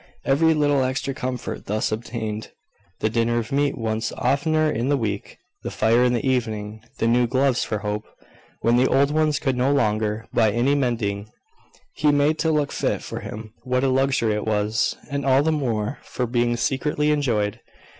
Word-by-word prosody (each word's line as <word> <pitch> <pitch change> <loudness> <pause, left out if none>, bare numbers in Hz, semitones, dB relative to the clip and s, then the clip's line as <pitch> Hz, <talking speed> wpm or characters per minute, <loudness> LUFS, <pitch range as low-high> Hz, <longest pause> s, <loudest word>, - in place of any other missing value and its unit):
Every 160 +4 +3
little 145 -2 +2
extra 130 +1 -2
comfort 125 -1 -5
thus 110 +2 -1
obtained, 110 -1 -4 0.5
the - - +2
dinner 115 +1 +1
of 115 -1 -3
meat 140 +1 +1
once 110 -1 -2
oftener 155 +4 +1
in 125 -3 -1
the 145 - +3
week, 105 -5 -4 0.2
the - - -4
fire 115 +3 +3
in 125 -1 +3
the 120 +2 -1
evening, 110 -4 -2 0.2
the - - 0
new 120 +1 +3
gloves 130 +1 +2
for 105 - -2
Hope, 105 +1 -3 0.6
when 115 +2 +3
the 130 +1 +4
old 140 +2 +3
ones 155 -1 +2
could 135 -4 0
no 125 +3 +2
longer, 110 -4 0
by 110 -2 +4
any 120 +6 +2
mending, 110 -7 -1 0.7
be 150 -1 +5
made 145 +2 +2
to 160 - +1
look 150 -2 +1
fit - - -1
for - - -5
him, 110 0 -8
what 125 +1 0
a 135 - +3
luxury 130 -4 +2
it 105 +1 -3
was! 105 +1 +1 0.2
And 140 0 -2
all 135 +1 +4
the 160 - +2
more 120 -5 -1
for 125 - -3
being 120 0 0
secretly 150 +4 0
enjoyed. 115 -9 0
125 Hz, 185 wpm, -23 LUFS, 110-140 Hz, 0.7 s, be